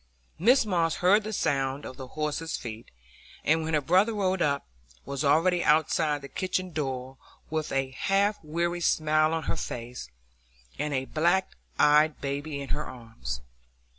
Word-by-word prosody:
Mrs 240 +8 +5
Moss 170 -5 +1
heard 200 +4 +4
the 215 - -4
sound 135 -7 0
of 130 - -7
the 130 -2 -8
horse's 155 +2 -2
feet, 115 -1 -8 0.5
and, 160 +1 +3
when 160 0 0
her 150 - +2
brother 185 +9 +3
rode 190 -3 0
up, 140 -2 +1 0.4
was 140 +1 -3
already 175 +5 +3
outside 150 -1 +2
the - - -6
kitchen 185 +2 -2
door, 135 -4 -4 0.3
with 155 -1 -2
a 135 -1 0
half 200 +8 +1
weary 170 +3 -1
smile 155 -1 +3
on 165 -1 -1
her - - -1
face, 120 - -6 0.7
and 150 -1 -1
a 130 0 -1
black 175 +6 +1 0.3
eyed 150 +1 +4
baby 140 +1 -3
in 140 - -6
her 150 - -1
arms. 115 - -7
155 Hz, 160 wpm, -28 LUFS, 140-175 Hz, 0.7 s, Mrs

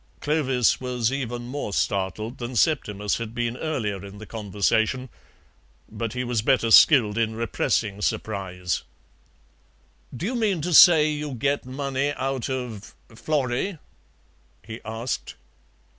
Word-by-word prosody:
Clovis 135 -6 +1
was 125 -2 -1
even 120 -3 -3
more 125 -2 -5
startled 100 +5 -2
than 120 +1 -5
Septimus 105 -9 +1
had 115 0 -6
been 120 -1 -1
earlier 110 - -3
in 100 0 -10
the 110 - -9
conversation, 110 +4 0 0.8
but 115 -1 -4
he 125 0 -2
was 120 -3 -1
better 115 -1 +2
skilled 115 -3 +6
in 110 -1 0
repressing 110 -2 -1
surprise. 95 -5 -2 1.4
"Do 170 - -4
you 235 - -1
mean 215 -7 0
to 175 +3 -2
say 160 -2 +8
you 150 -2 -4
get 140 +2 -1
money 140 +1 -2
out 135 -2 -3
of 125 -6 -5 0.2
Florrie?" 145 - -1 0.9
he 110 +1 -8
asked. 110 +3 -4
120 Hz, 130 wpm, -24 LUFS, 110-140 Hz, 1.4 s, say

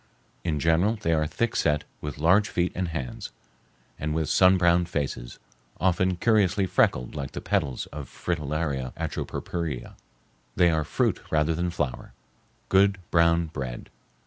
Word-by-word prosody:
In 80 -4 -1
general 85 +8 +3
they 85 -6 0
are 75 -1 +1
thickset, 75 -8 0 0.2
with 75 -1 -5
large 90 +8 +4
feet 90 0 0
and 90 0 -2
hands, 70 -7 -5 0.7
and 75 0 -2
with 80 -2 -1
sun 95 0 +6
browned 85 -1 +3
faces, 65 -6 -3 0.4
often 95 0 +2
curiously 100 -2 +3
freckled 65 -8 +1
like 70 -3 -5
the - - -4
petals 65 -3 -1
of 70 -3 -7
Fritillaria 75 -5 -2
atropurpurea. 80 -8 -4 0.6
They 85 -1 +4
are 80 -1 +1
fruit - - 0
rather 80 +1 +2
than 85 +2 -1
flower—good 95 +6 -1
brown 85 0 +4
bread. 65 -4 -6
80 Hz, 135 wpm, -26 LUFS, 75-90 Hz, 0.7 s, sun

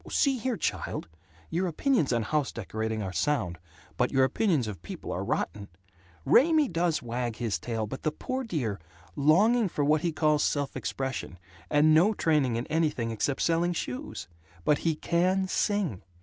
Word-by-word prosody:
"See 270 -3 +2
here, 240 0 -1
child! - - -3 0.4
Your 180 +3 0
opinions 175 - +1
on 120 -2 +1
house 150 +2 0
decorating 110 0 -3
are 95 -1 -4
sound, 90 - 0 0.4
but 125 - +1
your 135 -1 +4
opinions 150 - +1
of 100 -6 -6
people - - -7
are - - -2
rotten! 100 -1 -2 0.6
Raymie 310 -1 +5
does 165 -4 0
wag 120 -1 -3
his 115 -3 -2
tail. 115 -2 -3
But 130 +6 -7
the 155 - 0
poor 260 - -4
dear 130 - -2 0.4
Longing 205 - +4
for 145 -3 -1
what 150 +1 +3
he 170 - 0
calls 150 -1 +2
'self 145 -1 -1
expression' 130 -8 -4 0.3
and 150 +1 +5
no 190 +8 +5
training 150 -9 +2
in 120 +2 -2
anything 155 -8 0
except 130 +5 -1
selling 170 +1 +2
shoes. 110 - -5 0.4
But 150 - +3
he 165 -2 0
can 185 +4 +1
sing. 195 - 0
150 Hz, 165 wpm, -28 LUFS, 120-175 Hz, 0.6 s, Raymie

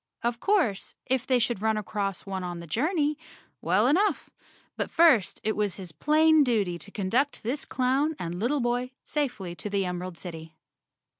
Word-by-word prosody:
Of 235 0 -1
course, 340 - +1
if 260 -1 0
they 255 - +4
should 235 -3 0
run 220 0 +1
across 200 -2 -3
one 190 -2 -4
on 175 -1 -5
the 170 - -8
journey, 300 - 0 0.4
well 185 +6 +3
enough, 365 +11 +2 0.4
but - - -2
first 315 - +4
it 215 - 0
was 205 -3 0
his 185 -4 -8
plain 310 - +4
duty 205 -9 0
to 185 - -9
conduct 225 +9 -1
this 255 +6 -2
clown 270 +5 +1
and 175 +1 -4
little 260 +6 +1
boy 245 +1 -1
safely 245 - -3
to 210 - -6
the 200 -1 0
Emerald 180 -1 -4
City. 160 -3 -9
220 Hz, 170 wpm, -27 LUFS, 185-275 Hz, 0.4 s, they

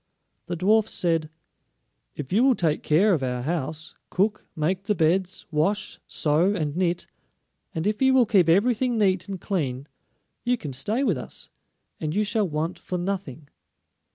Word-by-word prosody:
The 175 - -2
dwarfs 215 +5 +2
said: 165 -3 +1 0.9
"If 145 +3 -6
you 225 +5 +4
will 265 -2 +5
take 160 -6 0
care 190 +7 +4
of 155 - +1
our 125 -1 -2
house, 155 0 -3 0.2
cook, 205 +3 0
make 185 +5 -1
the 210 - +1
beds, 180 +3 +1
wash, 195 +7 0
sew, 165 +7 +2
and 150 -5 -2
knit; 175 -1 0 0.7
and 160 - -2
if 210 +2 0
you 265 0 +5
will 250 -2 +6
keep 195 -7 +4
everything 235 +6 +3
neat 190 -4 +2
and 195 -2 -5
clean, 140 -10 -2 0.6
you 245 0 +1
can 145 - -6
stay 205 - 0
with 195 - +1
us, - - -7 0.5
and 155 0 -3
you 210 - +3
shall 210 -2 0
want 155 +3 -2
for 180 - -4
nothing." 175 -7 -4
180 Hz, 165 wpm, -25 LUFS, 155-210 Hz, 0.9 s, will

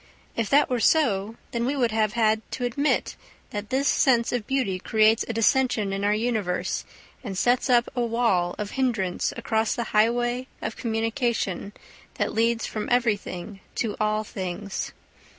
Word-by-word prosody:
If 230 -3 -1
that 285 +1 +5
were 250 -2 0
so, 225 -7 +2 0.2
then 235 -1 -1
we 265 +4 0
would 245 -4 +1
have 215 -1 +1
had 220 -2 +2
to 245 - -2
admit 280 +5 0 0.4
that 205 0 -5
this 270 +2 +1
sense 240 -4 +3
of 240 -4 -2
beauty 250 -9 0
creates 220 +3 +3
a 230 - -2
dissension 225 -3 +2
in 195 +1 -2
our 205 - +3
universe 215 -5 -1 0.4
and 195 -6 -5
sets 245 +5 +2
up 240 -1 +4
a 245 - 0
wall 230 -7 +1
of 210 -1 -4
hindrance 225 -9 0
across 220 -1 0
the 235 - -1
highway 240 +3 +2
of 220 - -4
communication 225 -4 -1 0.4
that - - -1
leads 230 0 +1
from 215 -1 -4
everything 210 -5 -1 0.2
to 220 -4 -1
all 215 0 +1
things. 190 0 -5
225 Hz, 160 wpm, -25 LUFS, 210-245 Hz, 0.4 s, that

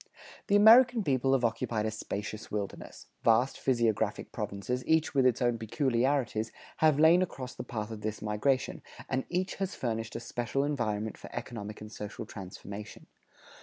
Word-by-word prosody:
The 200 - +3
American 230 +2 +7
people 135 -3 +2
have 130 -2 +3
occupied 115 -1 -1
a 110 - 0
spacious 110 0 -5
wilderness; 105 -2 -5 0.2
vast 120 +3 +3
physiographic 120 -5 0
provinces, 125 +6 -3
each 160 0 +2
with 135 -2 +4
its 125 0 +1
own 120 -1 +1
peculiarities, 120 -1 0 0.3
have 155 -3 +4
lain 165 +3 +7
across 130 -8 -4
the - - -6
path 110 -3 -5
of 110 -1 -7
this 110 0 -3
migration, 110 +6 0 0.3
and 130 0 -1
each 185 +1 -1
has 195 -1 -2
furnished 115 -2 -3
a - - -2
special 120 +3 -2
environment 110 -7 -2
for - - -10
economic 105 -2 -6
and 105 0 -9
social 105 -1 -6
transformation. 100 +1 -9
120 Hz, 160 wpm, -30 LUFS, 110-140 Hz, 0.3 s, American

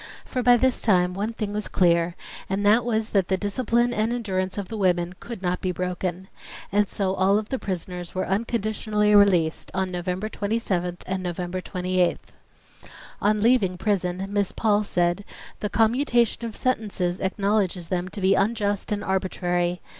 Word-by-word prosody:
For 255 - -2
by 245 0 +6
this 260 +1 +2
time 180 -4 +3
one 210 +4 -2
thing 210 -2 -4
was 210 -1 -1
clear, 170 -1 +2 0.3
and 195 +2 -1
that 220 +4 +5
was 220 -1 -1
that 195 -3 +2
the 190 - +1
discipline 235 +4 +1
and 220 +1 0
endurance 190 -6 -2
of 200 -2 -3
the 225 - -6
women 180 -3 +1
could 235 -5 -8
not 180 0 -1
be 185 - 0
broken. 180 +1 -3 0.4
And 205 0 +2
so 190 -2 -1
all 195 +2 +3
the 260 +5 -4
prisoners 180 -2 -5
were 185 - 0
unconditionally 215 0 0
released 185 -6 +4
on 190 -1 -1
November 180 +3 -3
27th 200 -5 -2
and 190 0 -2
November 180 0 -3
28th. 180 -1 -1 0.9
On 210 0 +2
leaving 215 -6 +3
prison 185 -2 -1
Miss 205 -2 0
Paul 210 -1 +2
said: 175 0 0 0.4
"The 210 - -2
commutation 235 +1 +2
of 225 - -6
sentences 205 -8 -1
acknowledges 195 -3 0
them 180 -1 -1
to 200 - -7
be 190 +1 +4
unjust 205 0 0
and 205 0 -1
arbitrary. 180 -2 -1
195 Hz, 160 wpm, -24 LUFS, 180-215 Hz, 0.9 s, by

